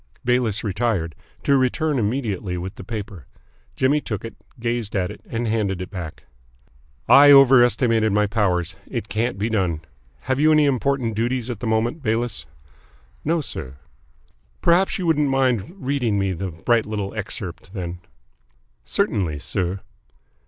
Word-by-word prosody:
Bayliss 120 -4 +1
retired, 100 -5 -1 0.3
to 140 - +3
return 135 +3 +1
immediately 105 -5 -2
with 95 +2 -5
the - - -10
paper. 100 - -7 0.5
Jimmy 140 +3 +2
took 105 -4 -5
it, 115 - -7 0.3
gazed 115 -3 -2
at 90 -2 0
it, - - -11
and 115 +1 -2
handed 105 -4 0
it 90 - -6
back. 85 -6 -7 0.8
"I 145 +1 +8
overestimated 120 -4 +5
my 105 +1 +3
powers. 100 -5 0
It 100 - -5
can't 115 0 -1
be 105 +3 -1
done. 95 -8 0 0.4
Have 130 0 -1
you 155 +1 +5
any 155 -1 +5
important 135 -3 0
duties 120 +2 -1
at 115 - -6
the 115 - -4
moment, 115 +8 0
Bayliss?" 115 - -1 0.8
"No, 165 +2 +1
sir." 65 - -5 0.8
"Perhaps 175 +3 +3
you 185 - -3
wouldn't 150 -3 +2
mind 135 - +1
reading 130 - 0
me 95 -1 0
the 95 +2 -4
bright 110 +8 +1
little 105 -2 -3
excerpt, 100 -4 -5
then?" 90 -2 -5 0.8
"Certainly, 75 - 0
sir." 95 +5 -2
110 Hz, 145 wpm, -22 LUFS, 95-130 Hz, 0.8 s, I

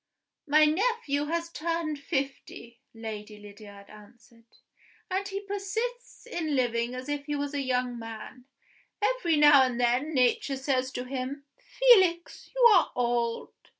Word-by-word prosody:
"My 305 +1 +5
nephew 310 - 0
has 335 +2 -3
turned 330 -2 -3
fifty," 270 -5 -5
Lady 215 -2 -8
Lydiard 205 -1 -13
answered, 230 +2 -18 0.6
"and 390 +2 -1
he 395 0 -5
persists 440 +6 -5
in 325 -10 -3
living 240 -1 0
as 255 +2 -7
if 290 -1 -3
he 295 0 -3
was 285 0 -3
a 285 - -1
young 250 -2 -1
man. 225 +2 -9 0.5
Every 420 -7 +1
now 295 -2 +7
and 250 -2 0
then 250 +6 +1
Nature 255 +2 +1
says 265 -1 -1
to 250 - -4
him, 265 +2 -5
'Felix, 375 -9 +3
you - - +1
are 365 - +3
old! 235 -1 -1
275 Hz, 140 wpm, -28 LUFS, 240-335 Hz, 0.6 s, now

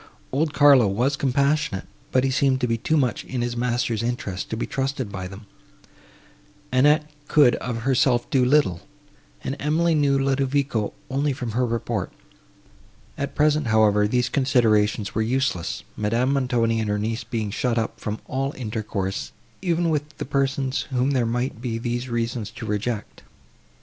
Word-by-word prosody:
Old 150 +3 +1
Carlo 140 -5 +6
was 120 +8 +1
compassionate, 140 -5 0 0.3
but 130 - +3
he 135 - +1
seemed 130 0 +2
to 125 - +2
be 115 - +1
too 155 +8 0
much 125 -6 0
in 125 -2 -3
his 120 0 -2
master's 120 -2 0
interest 115 -6 -3
to 110 - -3
be - - -2
trusted 135 -4 -2
by 95 -2 -5
them; 100 +3 -11 1.3
Annette 150 +4 +4 0.2
could 145 -5 +5
of 115 -2 -4
herself 130 -1 +2
do 130 -2 +4
little, 125 - +3 0.6
and 135 - -2
Emily 160 +3 +2
knew 145 -3 +3
Ludovico 135 -4 0 0.2
only 140 +1 +1
from 125 -3 -4
her 125 +3 +1
report. 115 -1 -2 1.0
At 140 -1 -4
present, 150 -2 +2
however, 105 -1 +4
these 125 +2 +1
considerations 110 -7 +2
were 110 - 0
useless, 120 -6 -1
Madame 115 +6 +1
Montoni 120 -4 +1
and 110 -1 -1
her 105 - +1
niece 110 +2 -2
being 110 -3 -3
shut 120 +2 0
up 115 - -2
from 105 0 -3
all 135 +2 -2
intercourse, 105 -5 -3 0.3
even 175 -2 +1
with 150 0 -3
the - - -4
persons, 135 0 0
whom 130 +1 +1
there 125 -4 +1
might 120 0 -2
be 120 -3 -2
these 120 +2 -3
reasons 115 -2 -2
to 115 +1 -8
reject. 105 +1 -3
125 Hz, 160 wpm, -24 LUFS, 110-140 Hz, 1.3 s, Carlo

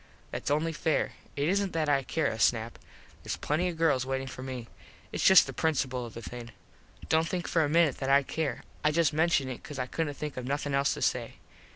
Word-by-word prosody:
Thats - - -3
only 155 +3 +1
fair. 160 -1 0 0.2
It 145 +1 0
isn't 195 +1 +1
that 160 -2 0
I 140 -2 +3
care 155 +3 -2
a 110 -5 -1
snap. 115 +1 +1 0.4
Theres - - -3
plenty 160 +5 0
of 170 - -6
girls 155 -6 +3
waitin 135 +1 -2
for 130 -1 -8
me. 130 -3 -6 0.4
Its - - -2
just 190 -1 +8
the - - -7
principul 130 -6 0
of 115 - -13
the 115 - -7
thing. 120 -1 -7 0.6
Dont 160 +1 +2
think 180 -1 -3
for 165 - +2
a 145 - 0
minit 160 -3 +3
that 135 - -2
I 140 +1 +5
care. 155 +2 -3 0.2
I 150 - +4
just 155 0 +2
menshun 155 -3 +2
it 130 -2 -6
cause 145 - -8
I 125 - -1
couldnt 145 +2 -3
think 150 -3 -5
of 125 -1 -4
nothin 145 +1 -2
else 140 0 +2
to - - -4
say. - - 0
145 Hz, 230 wpm, -29 LUFS, 130-160 Hz, 0.6 s, just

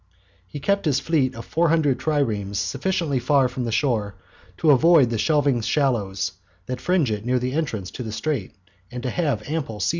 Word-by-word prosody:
He 115 - -7
kept 200 +6 0
his 140 -4 +2
fleet 135 -6 0
of 115 - -8
four 165 +1 +1
hundred 150 -5 +2
triremes 110 -10 -1
sufficiently 160 - -1
far 135 +1 +3
from 125 0 -4
the 115 - -2
shore 110 -6 0 0.4
to 155 - +4
avoid 145 -2 +5
the 115 - -1
shelving 145 -5 +2
shallows 115 -6 0 0.3
that 125 +2 -5
fringe 165 -5 +1
it 105 -1 -3
near 125 +2 +1
the 125 +1 -2
entrance 115 - -2
to - - -7
the 110 -3 -5
straits, 110 -2 -3 0.3
and 125 0 -7
to 130 - -2
have 145 -11 -1
ample 140 -9 -3
sea - - 0
room. - - +1
130 Hz, 200 wpm, -23 LUFS, 115-155 Hz, 0.4 s, avoid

